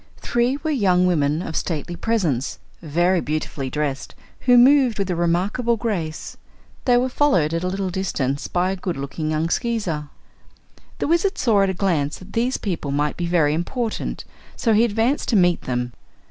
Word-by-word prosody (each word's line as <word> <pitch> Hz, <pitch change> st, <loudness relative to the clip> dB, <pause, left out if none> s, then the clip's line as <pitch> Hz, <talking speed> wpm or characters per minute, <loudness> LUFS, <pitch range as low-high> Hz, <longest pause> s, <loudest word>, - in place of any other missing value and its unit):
Three 240 Hz, +3 st, 0 dB
were 315 Hz, -, 0 dB
young 185 Hz, -9 st, +3 dB
women 155 Hz, -2 st, +1 dB
of 160 Hz, -, -6 dB
stately 165 Hz, 0 st, -3 dB
presence, 170 Hz, -, -1 dB, 0.2 s
very 175 Hz, +3 st, +1 dB
beautifully 150 Hz, -3 st, -3 dB
dressed, 145 Hz, 0 st, -3 dB, 0.2 s
who 245 Hz, -1 st, +4 dB
moved 255 Hz, -2 st, +5 dB
with 195 Hz, -2 st, -1 dB
remarkable 185 Hz, +8 st, +1 dB
grace. 175 Hz, -9 st, -4 dB, 0.5 s
They 245 Hz, -2 st, +5 dB
were 250 Hz, +1 st, +2 dB
followed 250 Hz, -, +2 dB
at 165 Hz, +1 st, -1 dB
a -, -, 0 dB
little 190 Hz, 0 st, -2 dB
distance 145 Hz, -7 st, -2 dB
by 180 Hz, +1 st, 0 dB
a -, -, -2 dB
good 180 Hz, -3 st, -4 dB
looking 140 Hz, +3 st, -4 dB
young 155 Hz, +1 st, 0 dB
Skeezer. 180 Hz, -, -2 dB, 0.9 s
The -, -, -2 dB
Wizard 345 Hz, +5 st, +1 dB
saw 220 Hz, -5 st, +3 dB
at 195 Hz, -, +2 dB
a 190 Hz, -, -2 dB
glance 165 Hz, -7 st, 0 dB
that 185 Hz, +2 st, -14 dB
these 245 Hz, +3 st, +1 dB
people 170 Hz, -7 st, -3 dB
might 145 Hz, +1 st, 0 dB
be 175 Hz, -, -3 dB
very 160 Hz, -4 st, +2 dB
important, 220 Hz, +8 st, -3 dB, 0.3 s
so 230 Hz, -3 st, +1 dB
he 215 Hz, +2 st, +5 dB
advanced 230 Hz, +5 st, 0 dB
to 235 Hz, -, +2 dB
meet 175 Hz, -3 st, +3 dB
them. 125 Hz, -1 st, -2 dB
180 Hz, 175 wpm, -22 LUFS, 155-230 Hz, 0.9 s, moved